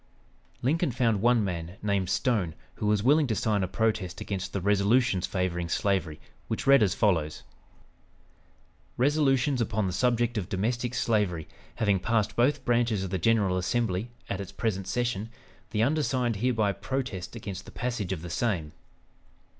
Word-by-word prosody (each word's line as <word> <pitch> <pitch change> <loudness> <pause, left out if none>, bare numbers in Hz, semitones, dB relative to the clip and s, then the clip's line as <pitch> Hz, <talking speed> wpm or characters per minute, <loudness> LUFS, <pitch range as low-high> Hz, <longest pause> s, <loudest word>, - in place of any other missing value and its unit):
Lincoln 160 +6 +2
found 115 -5 +1
one 120 -1 +4
man, 90 -1 -4
named 100 -3 0
Stone, 95 - 0 0.2
who 105 - -2
was 105 -1 +2
willing 145 +3 +4
to 110 - 0
sign 105 -1 +1
a 95 - 0
protest 100 -3 -1
against 95 -2 -4
the 100 - -2
resolutions 100 +1 +2
favoring 90 -2 -2
slavery, 90 -6 0 0.3
which - - -3
read 140 0 +7
as 100 -4 +2
follows: 80 -8 +1 1.5
"Resolutions 135 -1 +2
upon 110 -2 0
the 90 - -2
subject 120 +2 +1
of 90 - -6
domestic 120 +5 -1
slavery 100 -10 0 0.3
having 100 -3 +2
passed 110 +2 0
both 125 +5 +2
branches 120 -4 +2
of 95 - -5
the 95 - -1
General 100 -3 +2
Assembly 100 +2 -1 0.2
at 100 - -3
its 95 -1 -7
present 95 -3 -2
session, 120 -3 -1 0.4
the 110 0 +1
undersigned 130 -5 +1
hereby 110 -2 +1
protest 105 -2 -4
against 100 -4 -6
the - - -11
passage 120 -7 -3
of 85 -4 -3
the 85 - -6
same. 85 -8 -1
105 Hz, 155 wpm, -28 LUFS, 95-120 Hz, 1.5 s, read